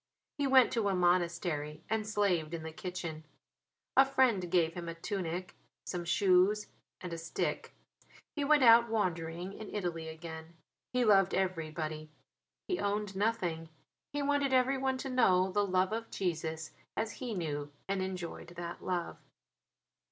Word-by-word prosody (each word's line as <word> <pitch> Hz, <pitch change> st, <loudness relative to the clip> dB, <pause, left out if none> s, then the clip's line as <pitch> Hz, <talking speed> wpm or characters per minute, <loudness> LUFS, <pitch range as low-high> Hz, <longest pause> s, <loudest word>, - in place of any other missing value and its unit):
He 285 Hz, -, +2 dB
went 260 Hz, -2 st, +6 dB
to 220 Hz, -4 st, +1 dB
a 195 Hz, -, +1 dB
monastery 170 Hz, -4 st, 0 dB
and 220 Hz, -1 st, -1 dB
slaved 180 Hz, -7 st, +1 dB
in 160 Hz, -, -6 dB
the 160 Hz, -, -5 dB
kitchen. 165 Hz, -2 st, -5 dB, 0.7 s
A 270 Hz, -, +9 dB
friend 255 Hz, -9 st, +2 dB
gave 170 Hz, -2 st, +2 dB
him 170 Hz, -1 st, -5 dB
a 165 Hz, -, -5 dB
tunic, 180 Hz, 0 st, -4 dB, 0.3 s
some 175 Hz, -2 st, -4 dB
shoes, 190 Hz, +3 st, +3 dB, 0.4 s
and 180 Hz, -2 st, -5 dB
a 165 Hz, -, -4 dB
stick. 165 Hz, -, -3 dB, 0.6 s
He 295 Hz, -, -1 dB
went 295 Hz, -1 st, +5 dB
out 235 Hz, 0 st, +7 dB
wandering 175 Hz, -3 st, -2 dB
in 215 Hz, 0 st, -8 dB
Italy 175 Hz, -5 st, -3 dB
again. 160 Hz, +1 st, -8 dB, 0.4 s
He 250 Hz, -1 st, +2 dB
loved 195 Hz, -3 st, +5 dB
everybody; 155 Hz, -4 st, -2 dB, 0.6 s
he 365 Hz, -, -1 dB
owned 205 Hz, -1 st, -1 dB
nothing; 180 Hz, -6 st, -1 dB, 0.4 s
he 290 Hz, 0 st, -2 dB
wanted 285 Hz, -1 st, +1 dB
everyone 260 Hz, +1 st, +2 dB
to 270 Hz, +1 st, -5 dB
know 190 Hz, -7 st, +4 dB
the 205 Hz, +2 st, +2 dB
love 185 Hz, +2 st, +2 dB
of 225 Hz, +1 st, -3 dB
Jesus 160 Hz, -3 st, -3 dB, 0.3 s
as 220 Hz, -1 st, -1 dB
he 240 Hz, -4 st, -3 dB
knew 145 Hz, -4 st, -3 dB, 0.2 s
and 195 Hz, -1 st, -1 dB
enjoyed 185 Hz, -3 st, -5 dB
that 170 Hz, 0 st, -6 dB
love. 180 Hz, -2 st, -2 dB
185 Hz, 150 wpm, -32 LUFS, 165-220 Hz, 0.7 s, A